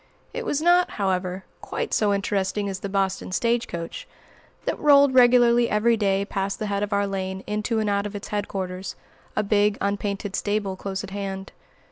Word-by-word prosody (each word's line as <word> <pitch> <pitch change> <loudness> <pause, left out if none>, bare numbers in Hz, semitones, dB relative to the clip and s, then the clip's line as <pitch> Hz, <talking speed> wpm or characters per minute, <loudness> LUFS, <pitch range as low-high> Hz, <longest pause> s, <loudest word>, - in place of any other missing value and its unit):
It 485 -2 -4
was 295 +2 0
not, 350 +1 +5
however, 185 -1 -1 0.2
quite - - -4
so 210 -2 +3
interesting 200 0 0
as 190 -1 -4
the 200 - -5
Boston 195 -1 -1
stage 235 +5 +1
coach, 170 -1 -6 0.6
that - - -2
rolled 285 -2 +6
regularly 240 -1 +5
every 230 +2 +3
day 200 -2 +1
past 195 -1 -2
the 215 - -3
head 200 -1 -1
of 205 0 -2
our 200 0 +2
lane 190 -1 -4
into 210 +2 -1
and 215 -1 0
out 200 0 0
of 205 - -9
its 205 - -7
headquarters, 190 -3 -4 0.4
a 215 - +1
big, 205 0 +2
unpainted 200 0 -2
stable 205 -2 -1
close 190 0 -4
at 195 - -8
hand. 195 -1 -5
200 Hz, 180 wpm, -24 LUFS, 195-215 Hz, 0.6 s, rolled